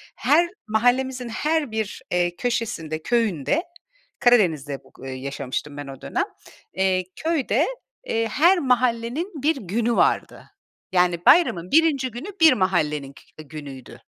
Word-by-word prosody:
Her 340 +4 +3 0.2
mahallemizin 245 +3 +1
her 300 +2 -1
bir, 220 -2 -3
eee, 175 0 +1
köşesinde, 170 -11 -3
köyünde, 230 - 0 0.6
Karadeniz'de 160 - +2
bug - - -23
eee, 135 - -5
yaşamıştım 140 +2 -5
ben 145 -1 -6
o 135 -1 -10
dönem, - - -1 0.5
eee, 190 -1 +1
köyde, 320 -3 0 0.4
eee, 225 0 0
her 340 - +4
mahallenin 250 - 0
bir 315 +2 +3
günü 230 +2 -1
vardı. - - +1 0.5
Yani, 180 -2 +1
bayramın 185 - +4
1'inci 290 -5 +3
günü 240 - -7
bir 320 -3 +8
mahallenin 150 - 0
kü 155 - -15
günüydü. 140 -4 -10
220 Hz, 125 wpm, -23 LUFS, 160-260 Hz, 0.6 s, bir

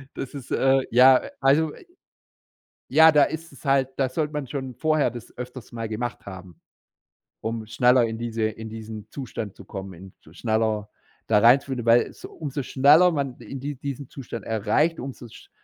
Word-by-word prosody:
Das 135 - -6
ist, 135 -3 -9
äh, 135 0 +3
ja, 130 +2 +7 0.2
also 150 +3 +3
i - - -16 1.0
ja, 160 0 +7
da 145 -1 +6
ist 165 +1 -6
es - - -16
halt 135 -1 +2
da 135 -1 +1
sollte 150 +3 -2
man 150 -3 -3
schon 130 -2 -5
vorher 155 -1 +1
das 120 -1 -11
öfters 125 0 -8
mal 115 -1 -4
gemacht 120 +2 -5
haben, 90 -3 -10 0.8
um 110 0 -4
schneller 125 +2 +4
in 115 0 -4
diese 115 -1 -3
in 110 0 -3
diesen 110 -1 -8
Zustand 115 -7 -6
zu 100 - -13
kommen, 95 -1 -7
in 95 +2 -13
sch 80 +2 -19
schneller 110 -2 0 0.4
da 105 -2 +4
reinzufinden, 125 +1 +3
weil 115 +1 +4
so - - -11
umso 145 -3 -5
schneller 150 +8 +5
man 140 -5 -3
in 120 +3 -8
die 145 +1 -4
diesen 140 0 -6
Zustand 120 -4 -8
erreicht, 115 +10 +1
umso 130 -2 -7
sch - - -15
125 Hz, 180 wpm, -24 LUFS, 110-140 Hz, 1.0 s, ja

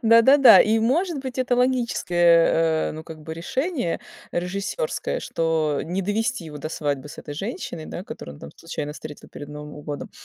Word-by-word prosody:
Да-да-да. 235 +4 +8
И 220 +1 +4
может 300 - +1
быть, 260 -1 -6
это 250 -1 +1
логическое, 175 -10 +3
э, - - -5
ну, 155 - -7
как 160 -1 -10
бы 160 +1 -6
решение 255 - -2 0.3
режиссерское, 200 - -2
что 160 -3 0
не 180 +5 -2
довести 220 +2 -1
его 150 -2 -8
до 150 - -5
свадьбы 145 -3 -3
с - - -11
этой 145 - -7
женщиной, 195 - -5
да, 180 - -6
которую 75 - -8
он - - -17
там 70 - -9
случайно 150 -3 -5
встретил 150 -1 -10
перед 145 - -9
Новым 150 0 -9
годом. 145 -1 -6
175 Hz, 175 wpm, -24 LUFS, 155-245 Hz, 0.3 s, Да-да-да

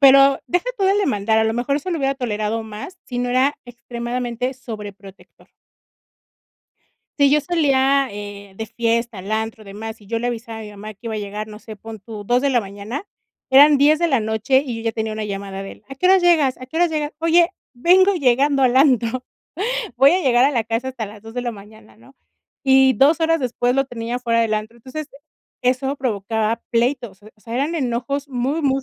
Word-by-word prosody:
Pero, 275 0 +7
deja 355 +6 0
todo 385 -1 +2
el 400 - +3
demandar, 220 - +1
a 220 - +4
lo 220 0 0
mejor 245 +4 0
eso 300 +6 -3
lo 340 - -1
hubiera 275 -2 0
tolerado 220 -3 -2
más, 220 - -9
si 245 -1 -4
no 245 0 -1
era 260 +3 +2
extremadamente 240 +1 -4
sobreprotector. 205 -5 -11 1.7
Sí, 280 -1 +6
yo 300 +1 +4
salía, 275 -4 +2
eh, 200 -1 -8
de 220 - -4
fiesta, 230 -1 -1
al 195 +3 -7
antro, 220 0 -2
demás, 220 +2 -8
y 200 - -17
yo 230 +1 -1
le 240 - -3
avisaba 230 -1 -5
a - - -7
mi 210 - -9
mamá 210 +1 -9
que - - -53
iba 220 - -3
a - - -2
llegar, 210 +1 -5
no 210 0 -10
sé, 220 -1 -10
pon 220 +1 -10
tu, 210 0 -9
2:00 245 +4 +2
de 280 - +2
la 245 -2 +3
mañana, 205 - -6 0.5
eran 290 +2 +8
10:00 300 +3 +4
de 340 - +2
la 270 -5 +2
noche 220 +5 +1
y 240 -3 -4
yo - - -6
ya 225 - 0
tenía 220 -1 -3
una 215 0 -4
llamada 195 -1 -5
de 195 - -7
él: - - -22
"¿A - - -6
qué 365 +7 +1
hora 380 0 +7
llegas, 330 -7 +3
a 255 - -9
qué 260 - -13
hora 350 0 +4
llegas?". 305 -1 -3
"Oye, 335 +1 +4 0.2
vengo 370 +9 +4
llegando 275 -1 +3
al 250 0 +3
antro, 255 -2 +3 0.7
voy 270 +2 +6
a 365 - +3
llegar 245 -3 +4
a 280 - +4
la 235 -6 0
casa 230 +3 -2
hasta 240 -5 -5
las 205 0 -12
2:00 225 +1 -11
de 245 - -1
la 240 -1 -2
mañana", 205 - -15
¿no? 120 +4 -20 0.5
Y 265 0 +5
2 290 +8 +4
horas 330 0 +3
después 245 0 0
lo 270 - +3
tenía 240 -1 -4
afuera 235 -2 +1
del 225 -1 +1
antro. 215 +2 -3
Entonces, 275 +5 -7 0.5
eso 260 +2 +1
provocaba 220 -3 -1
pleitos, 240 -4 -1
o 215 - -14
sea, 230 +1 -8
eran 295 +6 0
enojos 275 +2 -2
muy, 270 +5 -1
muy 270 -2 +1
245 Hz, 215 wpm, -21 LUFS, 220-275 Hz, 1.7 s, eran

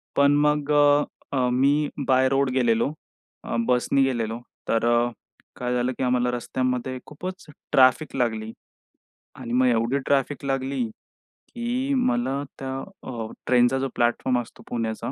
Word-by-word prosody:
पण 140 0 +5
मग 150 0 +1
अ, 145 0 +5 0.3
अ, 125 -1 +2
मी 140 +4 +2 0.2
by 130 0 +4
road 135 -1 +2
गेलेलो. 120 +2 +2 0.5
अ, - - -4
बसनी 125 +2 +2
गेलेलो, 115 -3 -1 0.3
तर 115 0 +1
अ, 120 +1 +3 0.4
काय 125 0 -2
झालं? 125 +1 +1
की - - -2
आम्हाला 125 -1 +2
रस्त्यामध्ये 130 +1 -2
खूपच 185 +5 -7 0.3
ट्रॅफिक 130 +3 +4
लागली. 110 -2 -1 0.9
आणि 115 - -6
मग 130 +1 +3
एवढी 120 +3 +2
ट्रॅफिक 140 0 0
लागली 135 -3 -1 0.7
की 250 +4 -1
मला 245 - 0 0.2
त्या 135 -1 -4 0.4
अ, 115 -2 -5 0.2
ट्रेनचा 125 +1 +4
जो 135 - -1
प्लॅटफॉर्म 120 +1 +1
असतो 115 - -14
पुण्याचा 115 +1 -3
130 Hz, 140 wpm, -24 LUFS, 120-140 Hz, 0.9 s, पण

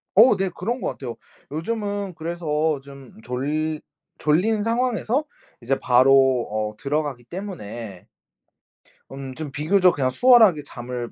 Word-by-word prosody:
어 225 +2 +7
네 190 -1 0
그런 240 +7 -3
것 - - -1
같아요. 120 -4 -6 0.4
요즘은 200 +3 -3
그래서 160 -2 -1
좀 140 -2 -13
졸 150 +5 -2 0.4
졸린 205 +8 +1
상황에서 245 +3 0 0.4
이제 130 +3 0
바로 130 0 +4
어 105 0 -2
들어가기 145 -2 -2
때문에 120 - -8 1.0
음 135 -1 -7
좀 150 0 -6
비교적 180 +6 +3
그냥 130 -3 +1
수월하게 220 - +6
잠을 120 -2 -6
150 Hz, 255 characters per minute, -23 LUFS, 130-195 Hz, 1.0 s, 어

